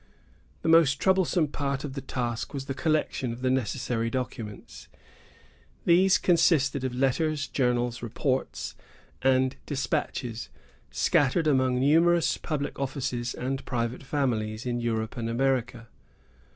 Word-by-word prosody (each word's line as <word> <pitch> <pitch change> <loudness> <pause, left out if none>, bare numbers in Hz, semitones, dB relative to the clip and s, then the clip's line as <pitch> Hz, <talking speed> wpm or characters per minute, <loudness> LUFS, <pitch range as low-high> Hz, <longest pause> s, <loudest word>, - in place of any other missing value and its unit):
The - - -2
most 165 -4 +6
troublesome 185 -4 +2
part 140 -1 -2
of 145 -3 -5
the 135 - -5
task 120 0 -3
was 135 -1 -4
the 135 - -3
collection 155 -4 0
of 120 +2 -8
the 130 - +2
necessary 120 -2 -1
documents. 115 -4 -6 1.0
These 185 +3 +5
consisted 145 -6 +3
of 130 -1 -2
letters, 145 +3 +1
journals, 120 -2 0
reports, 130 +3 -2 0.5
and 130 0 +2
despatches, 125 -4 -2 0.4
scattered 145 +4 +2
among 130 -4 +2
numerous 165 +4 +3
public 145 -3 -3
offices, 125 -3 -2
and 135 +2 -3
private 120 0 -2
families, 120 -6 -1
in 120 -1 -1
Europe 110 -1 -2
and 115 -1 -2
America. 125 -1 0
130 Hz, 125 wpm, -27 LUFS, 120-145 Hz, 1.0 s, most